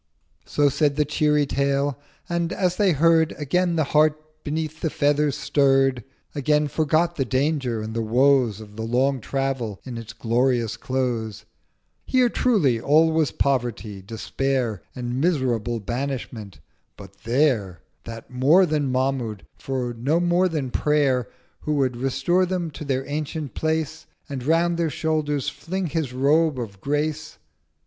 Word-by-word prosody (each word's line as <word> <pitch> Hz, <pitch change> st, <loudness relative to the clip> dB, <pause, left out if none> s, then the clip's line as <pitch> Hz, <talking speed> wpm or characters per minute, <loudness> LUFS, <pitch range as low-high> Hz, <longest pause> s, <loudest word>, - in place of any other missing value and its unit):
So 145 Hz, -1 st, +2 dB
said 145 Hz, +1 st, +1 dB
the 150 Hz, 0 st, +2 dB
cheery 150 Hz, 0 st, +2 dB
Tale: 140 Hz, 0 st, 0 dB, 0.3 s
and, 170 Hz, 0 st, -1 dB
as 180 Hz, -2 st, 0 dB
they 200 Hz, -3 st, +3 dB
heard, 160 Hz, +2 st, +3 dB
Again 170 Hz, +4 st, 0 dB
the 160 Hz, -, +2 dB
Heart 155 Hz, +1 st, +3 dB, 0.2 s
beneath 155 Hz, +1 st, -3 dB
the 160 Hz, -, 0 dB
Feather 145 Hz, +1 st, +2 dB
stirr'd: 135 Hz, -3 st, +2 dB, 0.3 s
Again 150 Hz, +1 st, +1 dB
forgot 160 Hz, +3 st, +1 dB
the 135 Hz, -, +2 dB
Danger 130 Hz, -3 st, 0 dB
and 110 Hz, +1 st, -5 dB
the 115 Hz, -, -1 dB
Woes 120 Hz, -1 st, +3 dB
Of 105 Hz, -1 st, -12 dB
the -, -, -4 dB
long 130 Hz, +4 st, +1 dB
Travel 135 Hz, -6 st, -2 dB
in 120 Hz, -3 st, -6 dB
its 115 Hz, -, -9 dB
glorious 120 Hz, -1 st, 0 dB
Close:—1090 120 Hz, -5 st, -2 dB, 0.6 s
'Here 255 Hz, -2 st, +3 dB
truly 165 Hz, -, +2 dB
all 160 Hz, +4 st, +4 dB
was 160 Hz, -2 st, +2 dB
Poverty, 120 Hz, -7 st, -1 dB
Despair 115 Hz, +1 st, -2 dB
And 125 Hz, +1 st, -3 dB
miserable 125 Hz, -8 st, 0 dB
Banishment—but 110 Hz, -5 st, -7 dB
there 115 Hz, -, +1 dB, 0.2 s
That 115 Hz, +1 st, -9 dB
more 145 Hz, +9 st, +5 dB
than 150 Hz, -5 st, 0 dB
Mahmud, 130 Hz, -5 st, -1 dB
for 130 Hz, -3 st, -3 dB
no 135 Hz, +8 st, 0 dB
more 175 Hz, +1 st, +2 dB
than 145 Hz, -6 st, -3 dB
Prayer 140 Hz, -5 st, +1 dB, 0.3 s
Who 150 Hz, -, -2 dB
would 130 Hz, -3 st, +1 dB
restore 175 Hz, +9 st, +1 dB
them 175 Hz, -3 st, -2 dB
to 150 Hz, -, -8 dB
their 135 Hz, -2 st, -1 dB
ancient 150 Hz, 0 st, -4 dB
Place, 160 Hz, 0 st, -2 dB, 0.2 s
And 135 Hz, -4 st, -5 dB
round 165 Hz, +4 st, +2 dB
their 170 Hz, -1 st, +1 dB
Shoulders 150 Hz, -2 st, -1 dB
fling 190 Hz, +2 st, -4 dB
his 155 Hz, -6 st, -1 dB
Robe 145 Hz, +3 st, +2 dB
of 100 Hz, -5 st, -7 dB
Grace.' 150 Hz, +3 st, -2 dB
140 Hz, 145 wpm, -23 LUFS, 125-155 Hz, 0.6 s, more